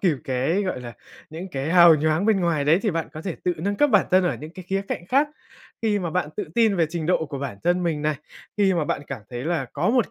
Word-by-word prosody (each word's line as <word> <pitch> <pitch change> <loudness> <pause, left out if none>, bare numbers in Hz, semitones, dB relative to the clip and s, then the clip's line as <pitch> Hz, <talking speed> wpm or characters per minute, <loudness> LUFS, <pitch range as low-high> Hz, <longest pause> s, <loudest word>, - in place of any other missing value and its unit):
kịp 170 -7 +2
cái, 135 +9 0
gọi 185 -10 -3
là, 120 -1 -8 0.4
những 170 +4 -7
cái 140 0 -3
hào 170 -2 +8
nhoáng 155 +5 +1
bên 215 -4 +3
ngoài 165 -5 +1
đấy 160 +4 +4
thì 215 - +1
bạn 165 -1 -3
có 155 0 -8
thể 185 -4 -4
tự 180 - +2
nâng 200 +6 -2
cấp 295 +2 +3
bản 205 -3 +4
thân 185 0 +4
ở 175 - 0
những 155 +1 -8
cái 185 - -9
khía 195 0 0
cạnh 175 - -4
khác. 280 +8 +2 0.5
Khi 215 -2 +2
mà 175 -4 -3
bạn 175 -2 -1
tự 205 - -2
tin 220 -4 +3
về 165 -2 +3
trình 165 -1 -4
độ 170 -2 +1
của 140 -2 -6
bản 135 -7 -5
thân 175 +1 +2
mình 160 -4 -1
này, 155 0 +1 0.4
khi 195 -2 +3
mà 165 -3 0
bạn 145 - -2
cảm 135 -6 -6
thấy 120 +1 -5
là 160 -5 -1
có 165 +9 +1
một 245 -2 +1
170 Hz, 280 wpm, -24 LUFS, 155-195 Hz, 0.5 s, hào